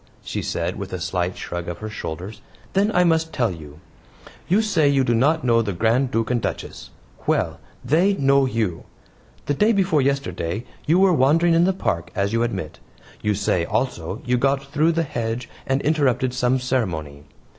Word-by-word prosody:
she - - -4
said, - - -2
with - - -6
a - - -4
slight 90 0 -2
shrug 85 0 -5
of 85 - -5
her 110 - -6
shoulders. 95 0 -6 0.3
"Then 200 +3 +2
I 180 - +5
must 160 -1 +2
tell 120 -8 0
you. 75 -3 -10 0.7
You 200 +5 +3
say 165 -9 +2
you 135 -1 +3
do 120 - +1
not 150 +7 +2
know 115 -2 +3
the 105 -3 -2
Grand 115 +8 +2
Duke 115 -1 -1
and 120 -2 +1
Duchess. - - -5 0.4
Well! - - 0 0.3
THEY 175 +7 +3
KNOW 140 -2 +4
YOU. 110 -9 -2 0.6
The - - 0
day 210 +11 +3
before 190 -8 +2
yesterday 130 -8 -2 0.2
you 165 +4 +4
were 190 -1 +5
wandering 165 +4 +4
in 165 +1 +4
the 190 - +3
park, 85 - -2
as 100 +2 0
you 115 - +2
admit. 95 -10 -3 0.4
You 105 -1 +1
say, 95 -3 +1
also, 105 -2 -2
you 125 0 +2
got 135 +1 +1
through 155 +4 +1
the 165 0 +1
hedge 115 -3 -3 0.2
and 135 0 0
interrupted 135 -4 +1
some 125 0 +2
ceremony. 90 - -2
125 Hz, 185 wpm, -22 LUFS, 105-155 Hz, 0.7 s, I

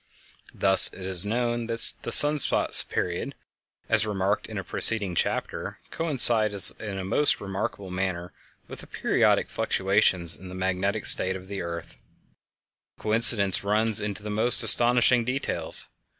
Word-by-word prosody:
Thus, 95 -1 +5
it 95 - -14
is 95 +1 -1
known 120 +1 -6
that 115 0 +6
the - - -10
sun 150 +1 +6
spot - - +1
period, 85 -1 -8 0.5
as 110 -1 0
remarked 100 -1 -6
in 110 - -12
a 95 - -8
preceding 100 -4 +1
chapter, - - -7
coincides 115 - +5
in 105 -3 -10
a 95 - -9
most 145 +10 0
remarkable 100 -1 -9
manner 90 -1 -8 0.3
with - - -13
the - - -12
periodic - - -3
fluctuations 95 -3 -1
in 95 - -16
the 90 - -13
magnetic 95 +3 -6
state 95 +1 -1
of 95 -1 -13
the 100 -1 -10
earth. 85 -1 -12 1.0
This - - -23
coincidence 110 -3 +3
runs 105 +1 -2
into 105 0 -9
the 105 - -10
most 110 +4 0
astonishing 120 0 +3
details. 120 -10 -7
100 Hz, 150 wpm, -21 LUFS, 95-115 Hz, 1.0 s, that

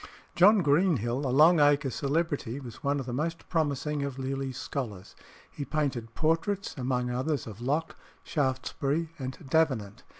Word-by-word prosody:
John 200 +2 +6
Greenhill, 140 - +2
a - - -1
Long 155 +6 +6
Acre 145 -2 +4
celebrity, 140 -3 -1
was 120 -5 -10
one 140 0 +1
of 135 - -4
the 120 - -4
most 165 +5 -3
promising 150 -2 0
of 140 -2 -3
Lely's 135 -1 -3
scholars. 110 -10 -5 0.4
He 145 - -5
painted 130 -6 -2
portraits, 165 +5 0
among 125 -2 -1
others, 130 +3 -1
of 110 0 -9
Locke, 150 +6 -1 0.3
Shaftesbury, 140 +3 -1
and 130 0 -5
Davenant. 130 -8 +1
140 Hz, 145 wpm, -29 LUFS, 125-155 Hz, 0.4 s, John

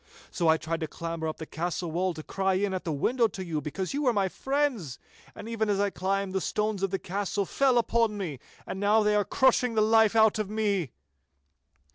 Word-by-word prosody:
So 170 - 0
I 160 0 +5
tried 165 +1 -3
to 160 - -3
clamber 165 0 -4
up 155 - -4
the 160 - -7
castle 170 +1 -3
wall 180 +1 -1
to 155 - -7
cry 190 +2 0
in 195 0 0
at 185 - -4
the 165 - -1
window 230 - +2
to 190 -2 -7
you, 160 -3 -2
because 185 - -4
you 285 - -1
were 255 -4 +2
my 195 -3 +1
friends. 265 - -1 0.4
And - - -8
even 225 -2 -1
as 200 -1 +1
I 200 0 +1
climbed, 195 +1 -2
the 190 - 0
stones 210 0 -1
of 195 - +1
the 195 - -1
castle 200 +2 -2
fell 265 +4 +2
upon 230 -2 +1
me, 165 -10 -4 0.3
and 190 - -5
now 210 +2 +3
they 210 0 +2
are 210 0 +3
crushing 250 0 +2
the 215 - +3
life 220 0 +4
out 220 -1 +4
of 210 -2 -2
me. 205 -7 0
195 Hz, 225 wpm, -28 LUFS, 175-220 Hz, 0.4 s, I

